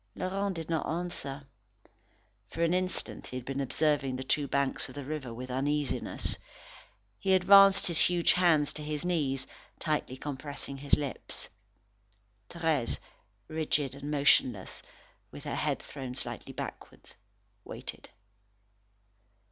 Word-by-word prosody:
Laurent 195 +1 -1
did 165 -2 -5
not 165 -2 -1
answer. 160 -5 -3 1.0
For 165 - -2
an 170 +1 +3
instant 185 0 -2
he 130 - -4
had 125 - -7
been 135 +1 -2
observing 140 -1 +1
the 130 - -3
two 140 +2 +2
banks 140 0 0
of - - -11
the 140 -2 -5
river 145 -4 -4
with 125 +2 -6
uneasiness. 145 +2 -1 0.8
He 190 -1 +4
advanced 195 +1 +7
his 170 -3 +1
huge 175 -1 +5
hands 165 -5 +4
to 150 - -6
his 150 +1 -3
knees, 145 -7 +1 0.3
tightly 150 -5 -1
compressing 140 0 -5
his 140 +1 +3
lips. 145 -3 -4 1.0
Thérèse, 160 -7 0 0.5
rigid 155 -3 0
and 140 +1 -6
motionless, 130 -8 +3 0.5
with - - -10
her - - -3
head - - -1
thrown 130 -3 -6
slightly - - -4
backward, - - -8 0.5
waited. - - -7
150 Hz, 130 wpm, -31 LUFS, 135-170 Hz, 1.0 s, advanced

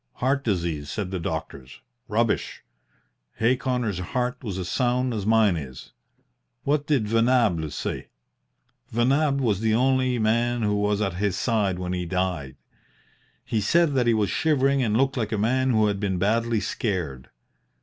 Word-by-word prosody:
'Heart 135 +2 0
disease,' 85 - -2
said 95 -1 -4
the 95 - -2
doctors. 65 -5 -6 0.3
Rubbish! 115 0 -1 0.7
Hay 120 +3 +2
Connor's 125 -7 -2
heart 125 +7 -3
was 100 -5 -4
as 90 -2 -4
sound 125 +2 0
as 105 -2 -3
mine 110 -4 +4
is. 65 -5 -8 0.7
What 145 +1 0
did 135 -8 +1
Venables 115 - +2
say? - - -4 0.8
Venables 140 +5 +2
was 105 -6 +1
the 110 0 +1
only 130 0 +2
man 115 +2 +1
who 105 -1 +1
was 105 0 0
at 95 -3 -2
his 100 -3 0
side 105 -5 0
when 90 0 -3
he 90 -1 -3
died. 90 -7 -2 0.9
He 110 - -1
said 165 +8 +3
that 125 -3 +1
he 115 - +4
was 105 -3 0
shivering 140 -2 +2
and 110 -3 +1
looked 135 +1 +1
like 110 -3 -2
a 110 - 0
man 130 +5 +1
who 110 -3 +3
had 100 -1 0
been 95 -2 -1
badly 115 +3 +1
scared. 85 - -3
110 Hz, 160 wpm, -25 LUFS, 95-125 Hz, 0.9 s, mine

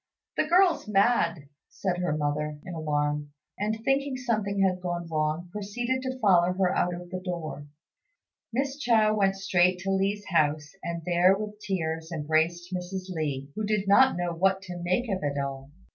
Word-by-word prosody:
"The - - +1
girl's 350 - +4
mad," 195 -7 +2 0.2
said 180 -2 -2
her 175 -4 0
mother, 150 0 -1
in 180 - -6
alarm; 150 -2 -1 0.3
and, 215 +2 -1
thinking 270 0 +1
something 215 -5 -1
had 185 -1 +1
gone 175 -1 -3
wrong, 155 +2 -1
proceeded 240 +6 -2
to 260 0 -4
follow 180 -6 +4
her 185 -1 +1
out 180 0 +1
of 175 0 -10
the 185 - -3
door. 170 -5 -5 0.8
Miss 275 +4 -1
Chao 225 -5 +3
went 195 -2 +2
straight 180 -1 +2
to 195 +1 -1
Li's 200 +2 0
house, 150 -3 +1
and 170 -1 -4
there 180 +2 +4
with 210 0 -6
tears 165 -5 -3
embraced 165 +3 0
Mrs. 185 +1 -4
Li, 145 -4 -3
who 215 - -3
did 210 -1 0
not 260 +3 +6
know 175 -1 -1
what 190 +3 +1
to 180 -1 -7
make 185 +8 0
of 195 -3 -1
it 145 -1 -2
all. 135 0 -4
180 Hz, 175 wpm, -27 LUFS, 160-210 Hz, 0.8 s, not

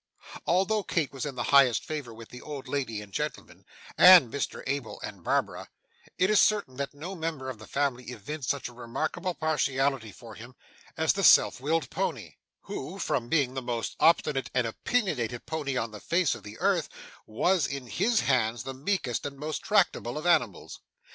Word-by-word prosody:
Although 195 +5 +2
Kit 165 -7 -1
was 135 +2 -4
in 140 - -6
the 120 - -2
very - - -3
highest 135 -4 +5
favour 150 -6 -5
with 115 0 -12
the 125 - -10
old 145 -3 -7
lady 125 -6 -3
and 100 -2 -16
gentleman, - - -5 0.3
and 180 -10 +9
Mr 140 - -3
Abel, 140 -3 -3
and - - -8
Barbara, - - -1 0.5
it 185 - +3
is 215 - +6
certain 200 -12 +1
that 140 0 -4
no 165 +7 -6
member 160 -7 -4
of 115 - -11
the 110 - -12
family 135 -3 -1
evinced 125 +4 -6
such 140 - -1
a 120 - -12
remarkable 135 +9 -3
partiality 135 -6 0
for 115 +2 -12
him 120 +4 -12 0.4
as - - +3
the - - -2
self - - +6
willed 160 +3 -1
pony, - - -3 0.2
who, - - -6
from 120 - -2
being 140 -6 +2
the 130 - -3
most 120 -2 -3
obstinate 150 -4 +3
and 125 -2 +2
opinionated 120 - -1
pony 145 -5 -3
on 115 -2 -2
the 105 - -9
face 170 -3 +1
of - - -8
the 105 0 -10
earth, - - +1 0.4
was, 160 +9 +1
in 140 -2 -5
his 215 - +1
hands, 120 -4 +1
the 135 +1 -5
meekest 135 - -2
and 140 -1 -9
most 150 +2 -4
tractable 175 - +1
of 155 - -5
animals. 125 - +1
135 Hz, 185 wpm, -28 LUFS, 120-160 Hz, 0.5 s, and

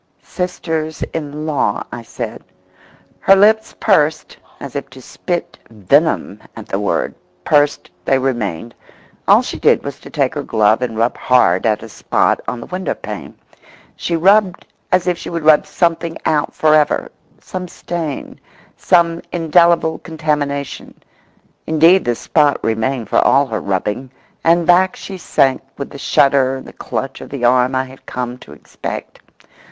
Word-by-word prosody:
"Sisters 160 -3 -3
in 150 -1 -5
law," 150 -3 0
I 120 - -6
said—Her 195 +9 -3
lips 220 +3 +3
pursed 155 -7 +1 0.2
as 140 -1 -8
if 140 - -4
to 130 - -13
spit 175 +6 -5
venom 105 -5 +1
at - - -9
the - - -3
word; - - -1 0.3
pursed 145 +3 +2
they 135 - +2
remained. 120 -5 -2 0.5
All - - +6
she - - -5
did - - +3
was - - -6
to - - -12
take - - 0
her - - -3
glove 110 +1 +2
and 115 -3 -3
rub 115 +2 +1
hard 115 -6 +3
at 105 -1 0
a - - -8
spot - - +1
on 125 - -3
the - - -8
window 185 0 -3
pane. - - -8 0.6
She 170 - -2
rubbed 190 +2 +3 0.3
as 185 -1 +3
if 175 -2 0
she - - -7
would 170 -2 -4
rub 155 -1 +5
something 170 -1 0
out 150 -2 0
for 155 -1 +3
ever—some 180 +4 -2
stain, 165 -4 -5 0.4
some 170 -1 +2
indelible 170 -1 +3
contamination. 150 -4 -3 0.7
Indeed, 165 +4 +5
the 120 -1 +1
spot 145 +4 +2
remained 115 +2 -1
for - - +2
all 140 +2 +4
her 110 -5 -4
rubbing, 105 +6 -2 0.3
and 170 +1 +3
back 185 +2 +4
she 190 -2 -8
sank 135 -5 +1 0.2
with 140 - -6
the 140 - -9
shudder 135 -1 +3
and 130 - -8
the - - -12
clutch 135 0 -5
of - - -9
the 135 -3 -2
arm 125 +1 +3
I 130 - +1
had 130 0 -16
come 125 0 -4
to 70 - -14
expect. 75 - -8
145 Hz, 155 wpm, -17 LUFS, 125-170 Hz, 0.7 s, All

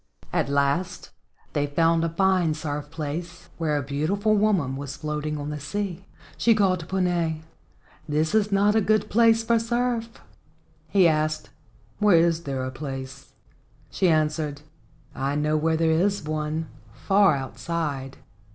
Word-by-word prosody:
At - - +1
last 140 +6 0 0.4
they 145 -1 0
found 165 +3 +2
a 165 - +1
fine 180 -2 +2
surf 150 -2 -4
place 165 +2 -6
where 155 -3 0
a 145 - -2
beautiful 165 +10 0
woman 195 -11 +1
was 140 0 -6
floating 150 0 -3
on 145 0 -4
the 150 - -5
sea. 190 +4 -4 0.3
She 230 -1 +4
called 190 -4 +2
to 165 - -9
Puna, 175 -4 0 0.7
"This 155 +3 0
is 210 -1 +2
not 200 +1 +3
a 220 - +4
good 215 +1 +1
place 225 0 +4
for 230 0 +2
surf." 235 0 -1 0.8
He 190 -3 +5
asked, 155 -1 0 0.5
"Where 205 -5 +5
is 170 0 +2
there 135 -2 -2
a 130 - -4
place?" 135 0 -7 0.6
She 185 - +2
answered, 155 -2 0 0.5
"I 135 +2 -2
know 150 +1 +1
where 160 +1 +1
there 160 0 +2
is 195 +4 +1
one, 155 +1 -3 0.3
far 195 -5 +3
outside." 140 -1 -4
160 Hz, 150 wpm, -25 LUFS, 150-195 Hz, 0.8 s, He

